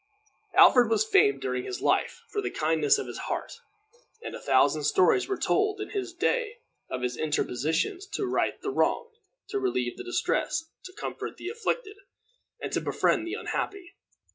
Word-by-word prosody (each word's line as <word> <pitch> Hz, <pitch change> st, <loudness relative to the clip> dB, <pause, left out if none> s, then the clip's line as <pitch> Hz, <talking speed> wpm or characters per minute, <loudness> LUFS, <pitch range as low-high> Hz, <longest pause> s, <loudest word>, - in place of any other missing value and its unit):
Alfred 245 Hz, -3 st, +7 dB
was 225 Hz, -, +2 dB
famed 415 Hz, -1 st, +4 dB
during -, -, -1 dB
all 390 Hz, -, -8 dB
his 385 Hz, -1 st, -4 dB
life 485 Hz, -, 0 dB
for 420 Hz, -2 st, -2 dB
the -, -, -2 dB
kindness 155 Hz, -2 st, +2 dB
of -, -, -3 dB
his -, -, -7 dB
heart, -, -, -4 dB, 0.6 s
and -, -, -6 dB
a -, -, -6 dB
thousand 155 Hz, -1 st, +3 dB
stories 185 Hz, -, +4 dB
were 390 Hz, -, -1 dB
told 415 Hz, 0 st, +1 dB
in 410 Hz, -, -5 dB
his 385 Hz, -4 st, -3 dB
day 435 Hz, +6 st, 0 dB, 0.3 s
of 125 Hz, -1 st, -4 dB
his 125 Hz, 0 st, -1 dB
interpositions 155 Hz, -, -1 dB
to 405 Hz, -, -2 dB
right 370 Hz, -, 0 dB
the 405 Hz, -, -1 dB
wronged, 465 Hz, +3 st, 0 dB, 0.4 s
to 405 Hz, 0 st, -1 dB
relieve 380 Hz, -2 st, -1 dB
the 380 Hz, -, -6 dB
distressed, 325 Hz, -3 st, -1 dB
to 370 Hz, -, -9 dB
comfort -, -, -6 dB
the 355 Hz, -, -5 dB
afflicted, 460 Hz, -1 st, -3 dB, 0.6 s
and -, -, -5 dB
to -, -, 0 dB
befriend 340 Hz, -, +1 dB
the 360 Hz, -, -3 dB
unhappy. 400 Hz, -4 st, -4 dB
380 Hz, 175 wpm, -28 LUFS, 245-415 Hz, 0.6 s, Alfred